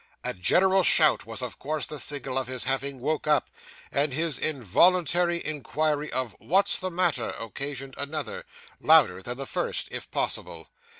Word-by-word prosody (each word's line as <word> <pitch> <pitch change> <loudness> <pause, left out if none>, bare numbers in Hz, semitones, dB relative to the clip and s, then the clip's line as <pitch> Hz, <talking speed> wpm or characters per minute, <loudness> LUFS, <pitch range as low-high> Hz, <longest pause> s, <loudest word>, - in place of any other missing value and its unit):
A - - -1
general 190 - +3
shout 155 -9 +4
was 115 +2 -6
of 125 - -6
course 155 +1 -2
the 150 - -4
signal 135 -1 -1
of 130 - -4
his 130 -1 -1
having 135 0 -2
woke 155 +3 -2
up; 150 -3 +2 0.4
and 140 +1 +1
his 155 -1 0
involuntary 170 - +2
inquiry 150 0 -1
of 125 -5 -3
'What's 190 +5 +2
the 185 - -2
matter?' 170 -8 0
occasioned 135 +4 -5
another, 160 - -4 0.3
louder - - +5
than - - -5
the - - -3
first, - - -3
if - - -5
possible. - - -3
145 Hz, 160 wpm, -26 LUFS, 130-170 Hz, 0.4 s, louder